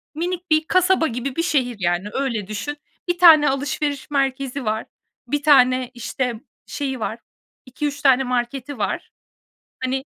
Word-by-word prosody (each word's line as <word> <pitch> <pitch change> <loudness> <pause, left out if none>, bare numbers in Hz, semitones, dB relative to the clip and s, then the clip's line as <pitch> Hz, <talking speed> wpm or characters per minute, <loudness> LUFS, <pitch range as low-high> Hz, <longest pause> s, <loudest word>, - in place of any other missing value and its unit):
minik 355 +2 -3
bir 310 0 +4
kasaba 370 -2 +3
gibi 250 +2 -4
bir 330 - 0
şehir, 260 -8 0
yani, 175 +2 0
öyle 235 -8 -2
düşün. 255 +8 -4 0.3
1 350 - +1
tane 320 -5 +8
alışveriş 280 +1 -2
merkezi 270 -1 -1
var. 215 +1 -1 0.4
1 290 +3 -1
tane, 255 -3 +4
işte, 245 +1 -3 0.3
şeyi 275 -3 -4
var, 225 +1 -3 0.5
2-3 285 +3 -4
tane 265 -1 +5
marketi 250 +2 -3
var. 210 - -3 0.7
Hani 265 +1 -1
270 Hz, 140 wpm, -21 LUFS, 245-295 Hz, 0.7 s, tane